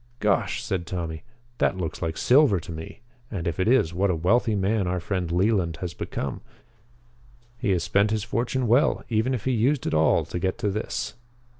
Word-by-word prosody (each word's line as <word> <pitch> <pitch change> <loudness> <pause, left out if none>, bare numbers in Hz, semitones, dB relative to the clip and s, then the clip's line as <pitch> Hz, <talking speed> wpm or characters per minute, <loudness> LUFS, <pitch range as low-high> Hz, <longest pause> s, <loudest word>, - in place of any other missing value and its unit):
"Gosh!" 105 -3 +1
said 90 -3 -3
Tommy. 85 -3 -4 0.4
"That - - +2
looks 85 -4 -4
like 80 -2 -2
silver 130 -7 +4
to 85 - -9
me. 80 +6 -8 0.3
And, 95 -6 -4
if 85 - -2
it 95 - +1
is, 120 -9 +3
what 95 +3 +1
a 90 - +2
wealthy 105 +7 +2
man 100 0 +1
our 90 +1 -1
friend 90 -1 -2
Leland 90 -2 +1
has 90 -3 -5
become. 70 -3 -4 1.2
He - - -1
has 90 -3 +2
spent 100 +2 +2
his 110 -1 -1
fortune 120 +3 -1
well, 120 +5 +3
even 115 +3 +1
if 110 - -6
he 130 - +2
used 125 +4 +1
it - - -1
all 80 0 +3
to 90 - -4
get 95 +3 -1
to 105 -4 -1
this." 105 +3 -3
95 Hz, 195 wpm, -25 LUFS, 85-115 Hz, 1.2 s, silver